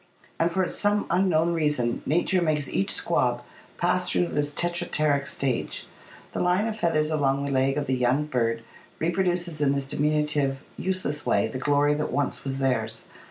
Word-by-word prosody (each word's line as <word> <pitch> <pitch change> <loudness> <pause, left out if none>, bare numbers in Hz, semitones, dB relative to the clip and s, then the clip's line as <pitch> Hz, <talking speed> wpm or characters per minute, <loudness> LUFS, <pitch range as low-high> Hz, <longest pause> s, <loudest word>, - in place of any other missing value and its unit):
And 165 - +3
for 185 +1 0
some 205 0 0
unknown 170 -2 +2
reason, 150 -7 0
nature 175 +4 +2
makes 150 -4 0
each 95 -4 -1
squab - - +1 0.3
pass 180 +1 +1
through 175 - +1
this 145 0 0
Tetrapteryx 155 -4 0
stage. 130 -3 -2 0.5
The - - -4
line 180 +4 +2
of 225 -1 -2
feathers 160 -6 +1
along 140 -2 +1
the 140 - -2
leg 135 +1 +2
of 145 - -1
the 130 - 0
young 130 +4 +2
bird 115 -5 -1 0.3
reproduces 175 -2 -1
in 140 -1 +3
this 140 -1 -1
diminutive, 150 -1 +1 0.2
useless 185 -6 -2
way - - +2
the 130 - -5
glory 145 +1 +3
that 150 +1 -2
once 145 -2 -1
was 135 -1 -3
theirs. 115 -5 -1
150 Hz, 165 wpm, -26 LUFS, 135-175 Hz, 0.5 s, And